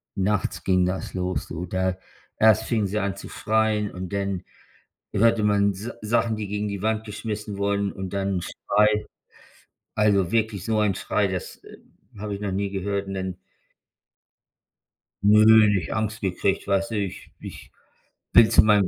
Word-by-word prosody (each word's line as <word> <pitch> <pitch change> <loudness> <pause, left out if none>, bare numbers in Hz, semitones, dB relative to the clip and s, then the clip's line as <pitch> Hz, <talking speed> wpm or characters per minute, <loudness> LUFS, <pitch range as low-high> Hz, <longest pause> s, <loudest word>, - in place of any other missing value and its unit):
nachts 100 +1 -1
ging 90 -1 +3
das 90 +1 -3
los 90 0 -2
du, 85 +2 -5
da 95 +1 -1 0.4
erst 110 0 +5
fingen 110 -4 0
sie 105 +3 -2
an 100 -1 -2
zu - - -10
schreien 110 -2 0
und 90 +1 -7
dann 100 -2 -2 0.7
hörte 110 +1 +3
man 100 -1 +3
s 105 +5 -6
Sachen, 115 +1 +1
die 105 - -4
gegen 105 +1 -2
die 100 -1 -4
Wand 110 0 0
geschmissen 105 -1 -5
wurden 100 0 0
und 95 0 -7
dann 100 0 -1
'n - - -7
Schrei. 105 +4 +1 0.9
Also, 100 -4 +2
wirklich 110 -4 0
so 110 -1 0
ein 100 -3 +2
Schrei. 100 +2 0
Das, 90 -3 -6
äh, - - -13 0.4
habe 105 -1 -4
ich 100 - -7
noch 100 -2 -2
nie 100 +1 -1
gehört. 100 0 -2
Und 95 - -5
dann 95 -1 -4 1.9
Nö, 110 +1 +7
nicht 95 -7 -1
Angst 110 0 -2
gekriegt, 95 +1 -1
weißt 100 +1 0
du, 110 - -2
ich 100 -3 -4
ich - - -10 0.6
bin 115 -1 +7
zu 115 - +6
meinem 105 -3 +4
100 Hz, 170 wpm, -24 LUFS, 95-105 Hz, 1.9 s, Nö